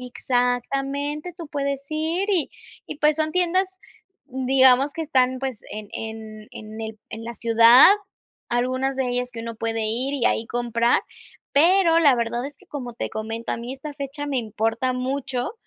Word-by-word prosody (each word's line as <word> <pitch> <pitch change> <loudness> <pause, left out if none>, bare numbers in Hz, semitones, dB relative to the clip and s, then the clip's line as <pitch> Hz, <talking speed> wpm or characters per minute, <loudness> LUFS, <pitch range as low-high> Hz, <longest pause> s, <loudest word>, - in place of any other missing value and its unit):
Exactamente. 275 +5 -2
Tú 330 -4 -8
puedes 280 -1 -3
ir 325 +6 -1
y 355 -7 +1 0.4
y 295 - -7
pues 300 -1 +3
son 310 0 0
tiendas, 370 +1 0 0.5
digamos 265 +1 +4
que 325 - -4
están, 260 -4 +1
pues, 265 -5 -4
en 215 -1 -6
en 220 -1 -7
en 215 +1 -9
el 220 -1 -6
en 225 +1 -7
la 235 0 -6
ciudad, 230 +2 +7 0.6
algunas 255 +2 0
de 260 -2 -1
ellas, 245 0 -2
que 230 - -6
uno 230 -1 -6
puede 225 0 -2
ir 255 +6 0
y 255 -4 -1
ahí 225 - 0
comprar. 235 0 +1 0.5
Pero 335 +2 +5
la 290 -5 +5
verdad 235 +2 -2
es 285 -1 -11
que, - - -23
como 255 -5 -6
te - - -4
comento, 225 +1 -5
a - - -2
mí 240 +2 -6
esta 280 +3 -8
fecha 280 +1 -5
me 280 -2 -1
importa 225 +2 -1
mucho. 255 +2 -3
255 Hz, 170 wpm, -23 LUFS, 230-285 Hz, 0.6 s, ciudad